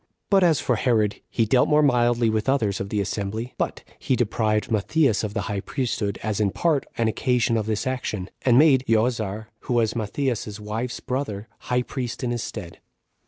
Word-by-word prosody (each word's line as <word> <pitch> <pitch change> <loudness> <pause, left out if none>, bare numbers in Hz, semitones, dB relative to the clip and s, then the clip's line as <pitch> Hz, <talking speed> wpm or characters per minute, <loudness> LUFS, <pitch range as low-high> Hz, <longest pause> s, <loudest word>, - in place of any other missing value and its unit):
But 195 -2 +5
as 165 -5 +4
for 125 - 0
Herod, 105 -4 +1
he 115 - +1
dealt 125 +4 +3
more 150 0 +5
mildly 120 -3 +3
with 110 +3 0
others 110 -8 +1
[of 100 - -4
the 105 - -1
assembly] 100 +4 -3
but - - -2 0.2
he 130 - +1
deprived 110 -2 0
Matthias 115 +2 +2
of 105 0 -4
the 105 - 0
high 100 0 -3
priesthood, 110 -4 -2
as 110 -2 -1
in 105 -2 +2
part 155 - 0
an 115 - +2
occasion 120 +1 +1
of 110 -1 -1
this 110 -1 -1
action, 120 -7 -3
and 125 -2 +4
made 135 -3 +6
Joazar, 110 -2 0
who 125 - -2
was 115 -1 +2
Matthias's 110 -1 -2
wife's 110 +4 -4
brother, 125 -6 -3 0.2
high 125 0 +2
priest 125 +1 -5
in 120 - 0
his 120 -1 -2
stead. - - -7
115 Hz, 190 wpm, -24 LUFS, 105-125 Hz, 0.2 s, made